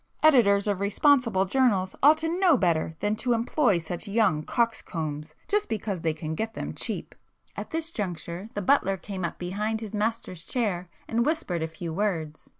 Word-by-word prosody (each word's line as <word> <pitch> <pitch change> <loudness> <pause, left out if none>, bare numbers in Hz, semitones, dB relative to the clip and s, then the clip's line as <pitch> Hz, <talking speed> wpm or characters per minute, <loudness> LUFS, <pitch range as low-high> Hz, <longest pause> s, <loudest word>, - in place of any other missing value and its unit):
Editors 220 -10 +5
of 205 -3 0
responsible 220 -1 +3
journals 195 -4 +2
ought 300 +3 +7
to 325 +3 -2
know 355 -7 +5
better 165 -4 +1
than 210 +1 +1
to 245 +1 +1
employ 235 - +2
such 170 +4 -5
young 200 -7 +2
coxcombs 155 -8 -2
just 415 0 +1
because 205 -4 -3
they 160 - +1
can 155 0 -5
get 220 +6 -3
them - - -4
cheap——" - - -2 0.4
[p - - -3
144]At - - -9
this 325 0 -3
juncture 185 - -5
the 205 - -2
butler 195 -5 +3
came 190 0 -6
up 170 - -3
behind 210 +5 -2
his 215 -2 -7
master's 210 -5 -2
chair 185 -8 -2 0.2
and 230 +1 +1
whispered 295 - -1
a 160 - -1
few 160 0 -6
words. 165 -6 -2
205 Hz, 180 wpm, -27 LUFS, 175-235 Hz, 0.4 s, ought